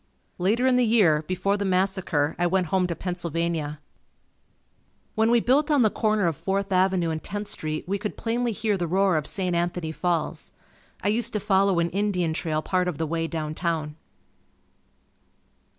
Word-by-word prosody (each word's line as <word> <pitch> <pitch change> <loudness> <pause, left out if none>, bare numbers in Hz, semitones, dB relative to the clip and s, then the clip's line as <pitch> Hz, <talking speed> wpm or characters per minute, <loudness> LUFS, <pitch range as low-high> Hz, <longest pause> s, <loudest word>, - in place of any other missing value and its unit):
Later 215 +8 +2
in 255 -1 +4
the 250 - +4
year, 205 -10 +4
before 185 +2 0
the 200 - -2
massacre, 185 -5 0
I 175 - +3
went 180 -1 0
home 185 -1 +3
to 170 - -3
Pennsylvania. 170 -4 -3 1.3
When 220 +1 +2
we 240 0 +5
built 280 +6 +2
on 290 -5 +4
the 215 - +3
corner 215 -3 +1
of 165 -2 +1
Fourth 195 +5 -2
Avenue 185 -2 +2
and 160 0 -3
Tenth 205 0 -5
Street, 155 +1 -4
we 200 +2 -1
could 210 +1 -4
plainly 235 +1 -1
hear 210 -1 -1
the 175 -2 -2
roar 190 +1 +2
of 150 -2 0
St. 185 -3 -1
Anthony 170 -1 -1
Falls. 170 0 -2 0.5
I 205 - +2
used 230 +2 0
to 210 - 0
follow 195 -2 +2
an 170 0 +1
Indian 185 -4 0
trail 155 -2 -2
part 185 -1 0
of 175 -5 -2
the 160 - -1
way 165 +1 -2
down 155 -2 -4
town. 155 -3 -2
185 Hz, 180 wpm, -25 LUFS, 165-205 Hz, 1.3 s, we